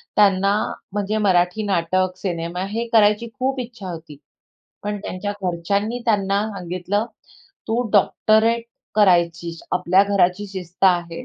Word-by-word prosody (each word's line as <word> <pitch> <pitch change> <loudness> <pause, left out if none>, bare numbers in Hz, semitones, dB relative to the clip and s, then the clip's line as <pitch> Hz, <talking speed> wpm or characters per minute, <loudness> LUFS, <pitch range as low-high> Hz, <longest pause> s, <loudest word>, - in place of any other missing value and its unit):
त्यांना 195 -1 +4 0.4
म्हणजे 205 +1 -1
मराठी 185 0 +2
नाटक, 185 -1 0
सिनेमा 175 -1 -3
हे 230 +1 -1
करायची 210 +1 +4
खूप 265 +1 0
इच्छा 230 -6 -7
होती. 160 -3 -9 0.7
पण 205 0 -3
त्यांच्या 205 +1 -4
घरच्यांनी 200 +6 -1
त्यांना 200 -3 +1
सांगितलं 185 +3 -2 0.6
"तू 225 +2 +1
डॉक्टरेट 220 +3 +3 0.3
करायचीस. 170 -4 +2
आपल्या 180 +1 +4
घराची 200 0 +1
शिस्त 185 -1 -4
आहे, 175 -2 +1
195 Hz, 115 wpm, -21 LUFS, 180-210 Hz, 0.7 s, त्यांना